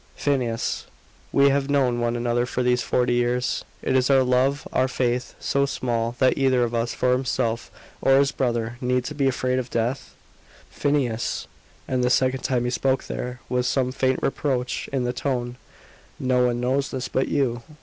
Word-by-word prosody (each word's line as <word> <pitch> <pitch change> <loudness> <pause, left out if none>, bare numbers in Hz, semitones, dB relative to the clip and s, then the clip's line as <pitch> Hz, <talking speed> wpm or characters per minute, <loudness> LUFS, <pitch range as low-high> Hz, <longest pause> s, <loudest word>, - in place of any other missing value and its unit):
"Phineas, 125 -5 -1 0.4
we 140 0 +5
have 140 0 0
known 130 -4 +2
one 120 0 0
another 120 0 0 0.2
these 125 0 +2
forty 125 +1 +1
years. 120 +1 0 0.2
Is 130 0 +2
our 135 -1 +5
love, 130 +3 +1
our 130 - +3
faith, 125 -1 -1
so 140 0 +1
small, 120 -3 -2
that 130 0 +3
either 130 -2 +3
of 120 0 -2
us, 115 0 -1
for 125 - +1
himself 125 -2 0 0.3
or 135 0 +5
his 140 0 +3
brother, 120 -1 -2
need 125 0 0
be 140 -1 +2
afraid 130 0 0
of 125 -1 -5
death? 120 +4 -2 0.3
" - - -26
"Phineas!" 135 -6 -1 0.4
and 130 -1 0
the 125 - +3
second 130 0 +2
time 125 -2 +1
he 125 - -1
spoke 130 +1 +1
there 125 0 -5
was 125 0 0
some 130 -2 +1
faint 130 0 +1
reproach 130 -3 -1
in 135 -2 0
the 125 0 -1
tone; 125 -2 -2 0.6
"no 125 -1 +2
one 120 0 -1
knows 130 +3 0
this 130 -1 -4
but 130 - 0
you. 125 -5 0
125 Hz, 175 wpm, -24 LUFS, 120-135 Hz, 0.6 s, we